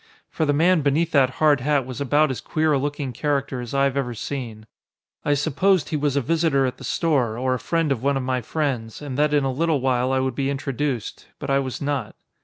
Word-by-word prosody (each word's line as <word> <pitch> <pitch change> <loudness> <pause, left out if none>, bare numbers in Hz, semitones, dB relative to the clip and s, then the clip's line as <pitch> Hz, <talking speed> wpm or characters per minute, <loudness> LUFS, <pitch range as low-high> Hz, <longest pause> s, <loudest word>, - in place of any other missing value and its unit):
For 160 - 0
the - - +4
man 165 +3 +3
beneath 150 +4 +1
that 135 -4 +4
hard 150 -3 +4
hat 145 -1 +1
was 130 0 -6
about 145 +1 +3
as 130 - -5
queer 155 -1 +1
a 140 - +2
looking 145 -2 -3
character 140 -1 -1
as 120 +2 -6
I 135 - +3
have 140 -1 +1
ever 125 -4 -2
seen. 115 -3 -5 0.6
I 145 - +2
supposed 160 +5 +1
he - - -2
was 145 -2 0
a 140 - +2
visitor 155 -2 +2
at 125 - -3
the - - -11
store, 135 -9 0
or 130 +1 0
a 130 - -2
friend 165 0 0
of 125 -4 0
one 140 +1 +1
of 135 - -2
my 130 0 -1
friends, 125 -5 -3
and 140 -3 -5
that 150 0 +3
in 145 -1 +3
a 135 - 0
little 155 +2 +1
while 130 0 +1
I 135 - +2
would 130 -1 -1
be 135 +2 -1
introduced. 135 -3 -3
But - - -4
I 135 - +4
was 130 0 -4
not. 145 -1 -2
140 Hz, 240 wpm, -23 LUFS, 130-150 Hz, 0.6 s, the